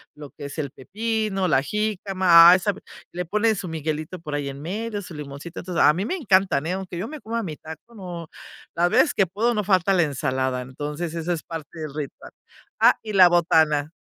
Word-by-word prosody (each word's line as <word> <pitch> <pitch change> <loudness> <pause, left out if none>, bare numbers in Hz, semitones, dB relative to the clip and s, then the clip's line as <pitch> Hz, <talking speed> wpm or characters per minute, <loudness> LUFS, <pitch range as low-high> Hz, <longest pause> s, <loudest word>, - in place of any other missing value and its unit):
lo 150 -1 -10
que 145 - -10
es 140 - -8
el 140 - -2
pepino, 210 - -2
la 135 -5 +3
jícama, 190 -3 +5
ah, 185 - +6
sabe 200 +2 -2 0.3
le 180 +1 -4
ponen 215 +5 +1
su 185 - -5
miguelito 155 +2 -4
por 150 -3 -5
ahí 145 -1 -3
en 140 +1 -8
medio, 205 +6 -4
su 180 - -10
limoncito. 150 +4 -8
Entonces, 180 -2 0
a 150 - +7
mí 190 +5 -2
me 370 - -2
encantan, 190 - +2
eh, 175 - -1
aunque 190 -2 -5
yo 200 - -3
me 305 +3 -8
coma 230 -1 -3
mi 160 -8 -5
taco, 160 +9 -12
no, 175 -5 -7 0.5
las 175 +1 +2
veces 315 - +4
que 195 - +3
puedo 215 +7 0
no 210 - 0
falta 190 -1 +2
la 175 -3 +4
ensalada, 130 -3 -1
entonces 150 +6 -5
eso 165 +1 -3
es 165 - -4
parte 165 0 -8
del 155 -3 -6
ritual, 150 -3 -7 0.5
ah, - - +6
y 215 -1 -6
la 185 -2 +8
botana. 160 -3 +2
175 Hz, 215 wpm, -23 LUFS, 150-195 Hz, 0.5 s, la